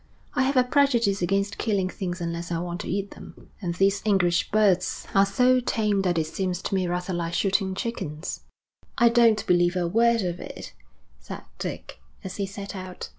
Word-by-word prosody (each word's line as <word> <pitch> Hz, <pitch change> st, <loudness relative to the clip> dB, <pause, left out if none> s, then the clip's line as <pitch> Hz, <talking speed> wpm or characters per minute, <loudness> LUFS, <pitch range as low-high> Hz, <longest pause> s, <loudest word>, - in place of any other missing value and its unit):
'I -, -, +1 dB
have 265 Hz, +1 st, +1 dB
a 255 Hz, -, +6 dB
prejudice 245 Hz, -7 st, +2 dB
against 195 Hz, +3 st, 0 dB
killing 200 Hz, -4 st, 0 dB
things 185 Hz, -1 st, -5 dB
unless 170 Hz, 0 st, -4 dB
I 170 Hz, -, 0 dB
want 175 Hz, +2 st, -4 dB
to -, -, -7 dB
eat 195 Hz, +1 st, -2 dB
them, -, -, -13 dB
and 175 Hz, -3 st, -3 dB
these 195 Hz, +2 st, +2 dB
English 185 Hz, -5 st, +2 dB
birds 200 Hz, -4 st, +2 dB
are 195 Hz, 0 st, +5 dB
so 250 Hz, +5 st, +3 dB
tame 210 Hz, -4 st, 0 dB
that 180 Hz, -3 st, 0 dB
it 160 Hz, -, +1 dB
seems 180 Hz, +2 st, -2 dB
to -, -, -3 dB
me 185 Hz, -2 st, +1 dB
rather 180 Hz, +1 st, -2 dB
like 170 Hz, -1 st, -2 dB
shooting 195 Hz, 0 st, +1 dB
chickens.' 185 Hz, -8 st, -4 dB, 0.6 s
'I 235 Hz, -, +6 dB
don't 230 Hz, -2 st, +4 dB
believe 175 Hz, 0 st, +3 dB
a 175 Hz, -1 st, 0 dB
word 230 Hz, +3 st, +3 dB
of 175 Hz, -1 st, -3 dB
it,' -, -, -9 dB, 0.5 s
said -, -, -9 dB, 0.2 s
Dick, -, -, -6 dB, 0.2 s
as 190 Hz, -2 st, -6 dB
he 200 Hz, -1 st, -2 dB
set 200 Hz, +1 st, -7 dB
out. 185 Hz, -1 st, -7 dB
195 Hz, 190 wpm, -25 LUFS, 175-215 Hz, 0.6 s, a